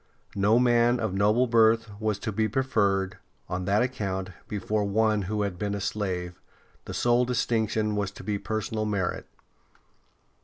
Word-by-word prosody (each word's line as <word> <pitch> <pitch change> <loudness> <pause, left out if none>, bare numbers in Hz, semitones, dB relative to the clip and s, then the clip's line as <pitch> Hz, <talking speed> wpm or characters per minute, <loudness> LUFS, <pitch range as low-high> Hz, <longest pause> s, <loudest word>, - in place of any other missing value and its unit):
No 100 +3 +3
man 120 0 +3
of 110 -4 -2
noble 105 +5 +3
birth 115 -2 +3
was 110 -2 0
to 110 - -4
be 110 +1 0
preferred, 100 -5 0 0.3
on 90 0 -3
that 100 +4 +3
account, 95 -7 -3 0.2
before 105 +1 -1
one 105 +1 +2
who 105 -1 0
had 95 -3 -4
been 100 -1 -1
a - - -3
slave; 90 -3 -3 0.4
the - - -6
sole 120 +1 +3
distinction 110 -3 0
was 100 -2 -1
to - - -11
be 105 -1 -2
personal 110 0 -2
merit. 100 -4 -2
105 Hz, 155 wpm, -27 LUFS, 100-115 Hz, 0.4 s, No